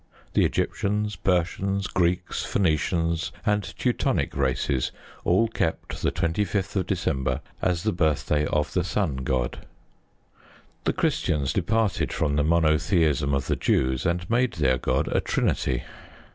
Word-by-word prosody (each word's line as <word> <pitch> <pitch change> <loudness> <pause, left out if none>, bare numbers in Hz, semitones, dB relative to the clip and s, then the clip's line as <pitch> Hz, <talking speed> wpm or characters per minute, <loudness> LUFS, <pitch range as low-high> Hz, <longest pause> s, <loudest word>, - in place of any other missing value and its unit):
The - - +4
Egyptians, 105 +1 -1
Persians, 95 +2 0
Greeks, 90 -2 0
Phoenicians, 85 -1 0
and 105 0 +2 0.2
Teutonic - - 0
races 65 -1 0 0.3
all 95 +7 +3
kept 80 -7 -3
the - - +1
25th 90 +3 -1
of 95 -2 0
December 80 -8 -1 0.2
as 90 -2 0
the 110 - +1
birthday 75 -3 +1
of 75 -1 0
the 90 - +1
Sun 90 -6 -1
God. 65 -2 -2 1.2
The - - +2
Christians 70 -4 0
departed 105 +3 +1
from 75 -2 0
the 75 - +2
monotheism 80 -2 +2
of 70 - -1
the - - 0
Jews, 65 +1 +1
and 90 +1 -1
made 120 +2 +2
their 65 -5 +1
God - - 0
a - - +1
Trinity. 60 -1 0
85 Hz, 130 wpm, -25 LUFS, 75-95 Hz, 1.2 s, The